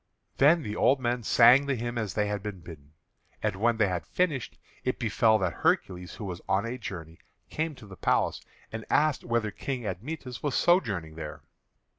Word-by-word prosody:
Then 155 +4 +5
the 105 -3 -4
old 135 +4 +3
men 120 -1 -1
sang 125 +5 +6
the 140 - +1
hymn 120 0 -4
as 105 -6 -3
they 105 - +2
had 105 -1 -2
been 100 -3 -6
bidden. 75 -3 -12 0.5
And 105 -3 0
when 115 +4 +1
they 110 -2 +3
had 90 -2 -3
finished, 155 -9 -1 0.3
it 130 - -1
befell 110 -1 +3
that 95 -5 -1
Hercules, 90 -1 0
who 105 - -7
was 90 -2 -5
on 95 +3 +2
a 125 +2 -4
journey, 85 -6 -7 0.3
came 155 -1 -2
to 110 - -13
the 100 -2 -11
palace - - +1 0.3
and 110 0 -5
asked 150 -2 +2
whether 115 -2 0
King 125 +2 -4
Admetus 125 - -5
was 145 -4 -1
sojourning 100 - +1
there. 75 -2 -7
110 Hz, 190 wpm, -28 LUFS, 95-130 Hz, 0.5 s, sang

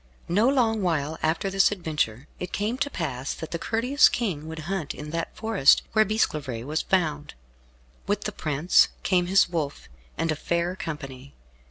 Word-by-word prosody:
No 210 +8 +3
long 230 -5 +2
while 160 -4 -1
after 165 +5 0
this 195 +1 +4
adventure 150 - -2
it 180 - -5
came 210 +4 -1
to 255 - 0
pass 135 - -3
that 160 - -8
the 170 - -3
courteous 250 - +3
King 175 -10 -2
would 160 0 -7
hunt 175 -5 -3
in 150 0 -7
that 165 0 -4
forest 220 -10 +4
where 220 -1 +5
Bisclavaret 150 - -1
was 155 +3 -1
found. 155 -6 -1 0.7
With 205 +1 0
the 210 - -3
prince 155 -2 +3 0.2
came 180 -2 +2
his 195 +2 +5
wolf, 155 - -4 0.3
and 165 +1 0
a - - 0
fair 170 +3 -1
company. 140 -6 -7
170 Hz, 170 wpm, -26 LUFS, 150-200 Hz, 0.7 s, where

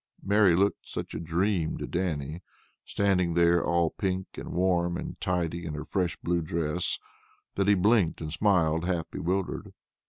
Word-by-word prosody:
Mary 100 -3 +4
looked 100 +3 +1
such - - -5
a - - -4
dream 85 +1 0
to - - -4
Dannie, 80 -3 -3 0.4
standing 90 -4 +1
there 85 0 +4
all 85 0 +2
pink 95 -1 -2
and - - -7
warm 90 -1 +1
and - - -7
tidy 85 -1 -1
in 80 -2 -4
her 75 0 -5
fresh 90 -1 -1
blue 85 0 0
dress, 80 +1 -1 0.6
that 100 0 0
he 100 - +6
blinked 100 -2 +3
and 75 -1 -5
smiled, 85 -4 +2
half 90 -3 -2
bewildered. 95 +2 -2
85 Hz, 160 wpm, -28 LUFS, 85-95 Hz, 0.6 s, he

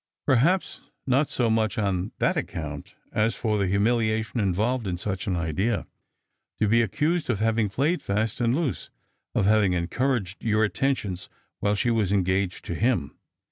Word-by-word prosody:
" - - -67
Perhaps 150 +8 +2 0.2
not 135 +3 +2
bo 120 - +3
much 110 -1 +1
on 95 -2 -1
that - - +1
account 75 -3 -5 0.2
as 110 +1 +1
for 105 -2 0
the 100 - +1
humiliation 110 +3 +1
involved 110 +4 0
in 90 -2 -2
such 95 +3 -3
an 95 - 0
idea. 85 +8 -1 0.7
To 110 - +3
be 115 +3 +4
accused 155 - 0
of 120 - +1
having 110 0 +1
played 145 - 0
fast 110 +4 -1
and 120 +1 +2
loose, 155 -4 -2 0.5
of - - +2
having 105 -3 +4
encouraged 100 +3 -1
your 110 -1 +2
attentions 105 -5 -1 0.3
while 105 0 +1
she 120 +4 +1
was 110 -5 +1
engaged 95 -1 0
to - - -3
him. 115 - 0
110 Hz, 165 wpm, -26 LUFS, 95-120 Hz, 0.7 s, be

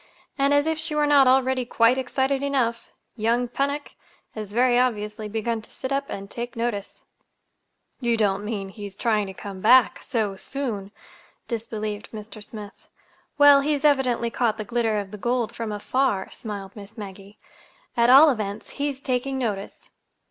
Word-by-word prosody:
And, 275 0 +2
as 285 0 +4
if 320 0 -1
she 315 -1 -2
were 300 0 +3
not 285 -2 +6
already 260 0 +3
quite 235 0 +3
excited 265 +1 0
enough, 260 -5 -1 0.2
young 235 +2 +1
Pennock 280 +3 -2 0.4
has 215 -2 -6
very 245 +2 +3
obviously 210 -3 -1
begun 225 +1 -2
to - - -16
sit 260 - -6
up 275 0 0
and 195 0 -6
take 240 +3 -6
notice." 230 -4 -3 1.0
"You 235 -3 +1
don't 205 -2 +1
mean 205 -3 -4
he 205 +1 -8
is 195 0 -12
trying 215 -3 +1
to 190 - -7
come 195 -1 -8
back—so 225 -3 +3
soon!" 220 -7 -4 0.6
disbelieved 215 -2 -4
Mr. 215 -1 -9
Smith. 210 -1 -11 0.5
"Well, 290 -1 +8
he's 290 0 0
evidently 255 -5 +2
caught 230 -3 0
the 215 - -5
glitter 230 -1 0
of 200 -2 -4
the 210 - -8
gold 240 0 0
from 230 -2 -4
afar," 210 0 0
smiled 200 -3 -7
Miss 205 +2 -12
Maggie. 200 0 -9 0.6
"At 235 -1 +4
all 285 +4 +9
events, 210 -3 -4
he's 285 -2 -2
taking 265 +1 -1
notice." 210 -6 -4
235 Hz, 165 wpm, -24 LUFS, 210-265 Hz, 1.0 s, all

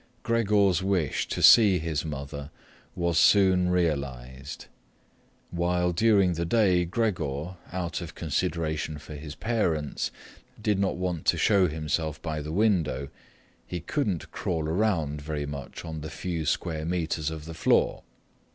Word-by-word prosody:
Gregor's 105 -5 +2
wish 95 -7 0
to - - -3
see 105 -6 +8
his 80 -3 -2
mother 70 -1 -6 0.5
was 85 -2 +1
soon 95 -3 +5
realized. 70 -6 -2 0.9
While 90 0 +1
during 100 -1 +3
the 85 0 -2
day 90 -2 +3
Gregor, 85 - -2
out 90 0 -3
of 85 - -8
consideration 80 -1 -2
for 75 +1 -10
his 75 0 -8
parents, 85 -11 -1 0.5
did 105 -3 0
not 100 -1 +1
want 90 -3 -3
to - - +4
show 100 -3 +4
himself 80 0 -2
by 80 -2 -3
the 75 +1 -6
window, 80 -9 +1 0.6
he 90 - -4
couldn't 100 - -2
crawl 80 -3 -2
around 80 -5 0
very 75 -1 -3
much 70 -2 -7
on 80 -1 -6
the 80 - -6
few 85 -3 -4
square 80 -1 -1
metres 80 -2 -1
of 80 -2 -7
the 80 - -7
floor. 80 - +2
85 Hz, 140 wpm, -27 LUFS, 75-95 Hz, 0.9 s, see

